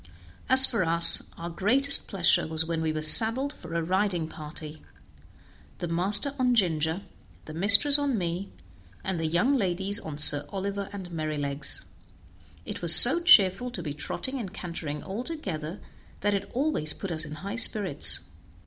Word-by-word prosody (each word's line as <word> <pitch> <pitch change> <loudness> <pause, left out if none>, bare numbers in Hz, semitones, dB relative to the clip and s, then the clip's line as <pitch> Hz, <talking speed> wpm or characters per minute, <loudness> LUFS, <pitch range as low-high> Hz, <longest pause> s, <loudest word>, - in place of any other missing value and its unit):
As 265 0 +8
for 230 -8 -2
us, 170 0 +2
our 170 +1 -8
greatest 260 +11 +2
pleasure 185 -6 0
was 160 0 -2
when 165 -1 -4
we 160 -1 -2
were 155 0 -4
saddled 230 - +1
for 165 -1 -11
a 170 - -2
riding 185 -1 -2
party; 155 0 -11 1.0
the 175 - -6
master 200 - +2
on 250 -1 0
Ginger, 165 -3 -2 0.4
the 155 - -11
mistress 205 - +7
on 280 -4 -2
me, 180 +1 -6 0.5
and 190 -3 -4
the 160 - -3
young 175 - 0
ladies 195 -4 -2
on 155 -2 -9
Sir 145 -1 +4
Oliver 200 0 -6
and 190 -3 -10
Merrylegs. 150 -3 -5 0.8
It - - -9
was 170 -1 +7
so 275 +8 +8
cheerful 240 - +3
to 185 -8 -7
be 150 -3 -6
trotting 260 - -6
and 200 -6 -8
cantering 160 -4 -8
all 200 +5 -7
together 190 - -7 0.4
that 205 +1 -1
it 200 - -5
always 260 - 0
put 195 - -8
us 160 -1 +1
in 150 -1 -7
high 195 +7 -8
spirits. 205 - +2
185 Hz, 165 wpm, -25 LUFS, 160-215 Hz, 1.0 s, As